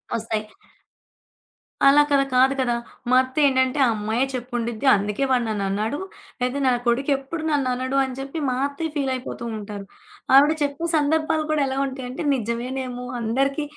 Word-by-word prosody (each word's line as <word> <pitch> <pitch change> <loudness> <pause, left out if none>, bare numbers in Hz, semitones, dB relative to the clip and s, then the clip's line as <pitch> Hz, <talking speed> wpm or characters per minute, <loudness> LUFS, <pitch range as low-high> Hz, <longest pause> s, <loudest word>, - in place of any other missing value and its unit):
ఒస్తాయి. 220 -1 -3 1.4
అలా 285 +1 +7
కదా! 280 -1 +4
కాదు 260 +2 +5
కదా! 250 -2 +1 0.4
మా 255 - +4
అత్త 260 +2 -8
ఏంటంటే, 260 0 +2
"ఆ - - +3
అమ్మాయే 220 +4 0
చెప్పుండిద్ది 240 -1 -3
అందుకే 205 +5 -2
వాడ 250 -1 +3
నన్నన్నాడు. 210 +5 -2 0.4
లేదా 250 +3 0
నా 260 - +4
కొడుకెప్పుడు 275 +5 0
నన్ననుడు" 260 -2 0
అని 265 -1 -4
జెప్పి 275 +4 -5
మా 250 - 0
అత్తయ్య 305 +3 -5
ఫీలయిపోతూ 260 -3 -3
ఉంటారు. 205 -1 -7 0.5
ఆవిడ 285 +3 +7
చెప్పే 285 +3 -2
సందర్భాలు 310 +1 +1
కూడా 305 -1 +1
ఎలా 265 0 -3
ఉంటాయంటే 260 -1 -6
నిజమేనేమో 250 +2 -4
అందరికి 275 +6 0
260 Hz, 140 wpm, -23 LUFS, 235-275 Hz, 1.4 s, అలా